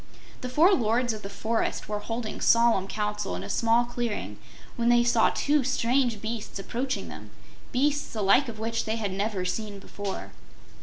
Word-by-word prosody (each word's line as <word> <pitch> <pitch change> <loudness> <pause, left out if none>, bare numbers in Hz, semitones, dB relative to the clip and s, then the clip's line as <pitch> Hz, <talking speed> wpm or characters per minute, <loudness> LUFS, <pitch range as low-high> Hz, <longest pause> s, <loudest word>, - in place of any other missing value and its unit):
The 250 - -4
four 325 +10 +5
lords 240 - +2
of 215 - -7
the 195 - -7
forest 220 +3 -2
were 210 -1 -2
holding 225 +1 -5
solemn 230 -5 +4
council 210 - -2
in 90 - -5
a 100 - -7
small 230 +1 +3
clearing 240 -3 -4 0.4
when 235 -1 +1
they 240 0 +5
saw 235 -2 +4
two 295 -1 +1
strange 245 -3 +1
beasts 220 -2 -4
approaching 245 +7 -3
them - - -10 0.4
beasts 285 +3 +1
the 215 -2 -3
like 235 +7 +4
of 220 - -7
which 230 +1 -2
they 220 0 -1
had 210 -4 -2
never 200 -1 -1
seen 205 +2 -3
before. 195 0 -6
230 Hz, 175 wpm, -27 LUFS, 210-240 Hz, 0.4 s, four